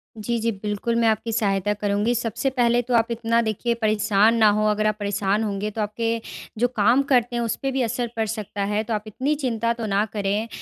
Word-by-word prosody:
जी, 235 +2 -2
जी, 230 +1 0
बिल्कुल, 210 +3 -3
मैं 230 -1 +3
आपकी 220 +1 0
सहायता 205 -2 +1
करूँगी। 205 +3 0
सबसे 230 +3 -1
पहले 240 -2 +2
तो 245 +1 -4
आप 230 0 +3
इतना 230 0 +1
देखिए 230 +2 -1
परेशान 215 +1 +3
ना 215 -2 +6
हों। 215 +1 +1
अगर 215 0 0
आप 215 - +1
परेशान 205 +1 0
होंगे, 205 0 -2
तो 220 - -4
आपके 225 +2 -2 0.4
जो 245 - +4
काम 235 +3 +3
करते 245 -1 +3
हैं, 240 - 0
उस 230 - -1
पे 270 0 -1
भी 265 0 -1
असर 240 +1 -1
पड़ 225 -1 0
सकता 205 -2 -4
है, 210 +2 0
तो 225 - -4
आप 210 0 -2
इतनी 270 +8 -1
चिंता 235 -4 -1
तो 230 -1 -5
ना 205 +1 +1
करें। 205 +2 -1
220 Hz, 225 wpm, -23 LUFS, 210-235 Hz, 0.4 s, ना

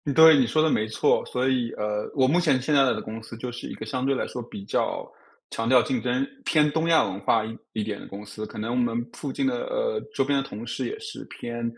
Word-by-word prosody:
对， 160 -1 +9
你 130 -4 +4
说 155 +7 +2
得 160 - +3
没 110 -6 +1
错。 110 - +2
所 125 +1 0
以 125 -3 +1
呃， 105 0 -2
我 130 -2 +4
目 170 +6 +3
前 150 -7 +3
现 150 +3 0
在 140 -1 +6
的 - - +1
公 110 +1 -7
司 110 +1 -10
就 125 +1 -5
是 120 - -7
一 - - -5
个 110 - -7
相 130 +3 -3
对 135 0 +2
来 - - -1
说 125 - -5
比 105 -4 -9
较 - - -1 0.4
强 115 0 -2
调 130 -1 +7
竞 255 -2 -1
争， 270 +1 0 0.2
偏 150 -2 +3
东 165 +2 0
亚 165 - +6
文 100 -2 -3
化 110 +2 +2
一 115 +1 -6 0.2
一 110 -2 -1
点 105 -1 -4
的 - - -10
公 100 +1 -8
司。 105 +1 -7
可 - - -11
能 110 +2 -3
我 - - -1
们 120 -1 +1
附近 145 - -3
的 250 -2 0
呃， - - -1
周 135 - +2
边 140 0 +2
的 135 - -7
同 110 +3 -7
事 120 - -3
也 430 - -5
是 440 -1 -7
偏， 120 0 -6
125 Hz, 295 characters per minute, -26 LUFS, 110-155 Hz, 0.4 s, 对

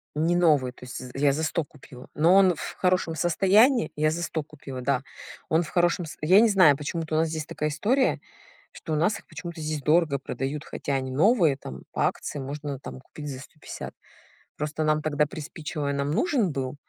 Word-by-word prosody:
Не 165 +3 +1
новый, 150 -8 +3
то 125 - -16
есть, 125 - -7
з 125 -1 -9
я 140 0 +3
за 155 - -2
100 160 +1 0
купила. 130 -3 -14
Но 170 +5 +4
он 190 -2 +6
в - - -7
хорошем 180 -3 +1
состоянии. 195 - +3
Я 155 +1 +2
за 170 +2 -3
100 160 -2 -2
купила, 140 -4 -9
да. 135 0 +1 0.5
Он 160 +2 +3
в 155 - -9
хорошем 175 0 +1
с 155 - -9
я 185 +6 +6
не 225 0 +5
знаю, 180 -8 +6
почему-то 155 +2 -3
у - - +2
нас 160 0 +2
здесь 155 -1 -4
такая 150 0 -2
история, 245 - +1 0.5
что 160 - -6
у - - +2
нас 175 +7 +1
их - - -21
почему-то 170 -3 -8
здесь 155 -1 -3
дорого 155 -2 +2
продают, 135 +3 -4
хотя 140 - -4
они 130 -1 -2
новые, 165 - +3
там 65 - -9
по - - +1
акции - - -4
можно 140 0 -5
там 130 - -9
купить 150 +3 -10
за 130 -2 -6
150. 150 +2 -9 0.6
Просто 150 +1 -2
нам 155 0 +2
тогда 150 -1 +1
приспичило, 150 -1 -5
и - - 0
нам 140 +1 -1
нужен 250 - +1
был. 135 -1 -3
155 Hz, 210 wpm, -26 LUFS, 140-170 Hz, 0.6 s, он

